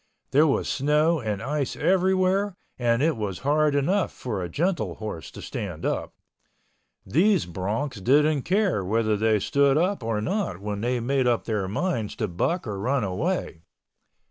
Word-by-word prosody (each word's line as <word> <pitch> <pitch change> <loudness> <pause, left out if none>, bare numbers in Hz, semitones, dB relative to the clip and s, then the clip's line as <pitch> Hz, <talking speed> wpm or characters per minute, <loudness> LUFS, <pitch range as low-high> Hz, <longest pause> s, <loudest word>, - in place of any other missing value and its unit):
There 150 +4 +5
was 140 - +1
snow 150 +4 +2
and 105 -5 -3
ice 145 -1 -2
everywhere 190 +1 +2 0.2
and 120 +1 +2
it 160 -1 +2
was 105 -5 -3
hard 150 0 +3
enough 180 +7 +1
for 110 -7 -4
a 90 - -4
gentle 140 - -1
horse 105 -7 -6
to - - -10
stand - - -5
up. - - -2 0.9
These 180 - +3
broncs 100 - -3
didn't 150 +4 +4
care 190 - +1
whether 110 +3 +1
they 110 +1 +2
stood 140 +6 +3
up 185 +2 +1
or 115 -2 -1
not 115 - -2
when 105 0 -4
they 120 +2 0
made 130 +2 +1
up 120 -2 +2
their 105 -4 -1
minds 115 - -2
to 110 - -2
buck 135 - -1
or 105 -4 -4
run 125 +4 0
away. 105 - -2
130 Hz, 165 wpm, -25 LUFS, 105-160 Hz, 0.9 s, There